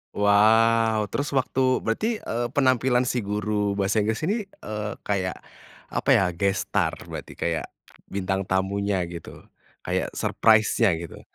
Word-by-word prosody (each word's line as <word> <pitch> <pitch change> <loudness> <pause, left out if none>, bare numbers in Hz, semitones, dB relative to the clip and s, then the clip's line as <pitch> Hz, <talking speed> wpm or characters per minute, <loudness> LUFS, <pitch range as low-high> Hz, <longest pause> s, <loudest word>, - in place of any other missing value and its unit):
Wow, 110 +2 +4
terus 145 - -1
waktu 130 -1 +1
berarti, 115 - -1 0.2
eee, 120 +2 -2
penampilan 130 -2 +3
si 125 0 -1
guru 105 -1 -1
bahasa 100 +2 +1
Inggris 110 +5 -1
ini, 200 +8 +1
eee, 105 - -6
kayak 95 -3 -1 0.6
apa - - -2
ya, - - +4
guest 95 +3 -1
star - - +1
berarti, - - -8
kayak 85 -2 -2 0.4
bintang 95 -1 -2
tamunya 95 0 0
gitu, 85 -1 -9 0.4
kayak - - -1
surprise-nya 110 -3 +3
gitu? 85 0 -8
105 Hz, 130 wpm, -25 LUFS, 95-115 Hz, 0.6 s, Wow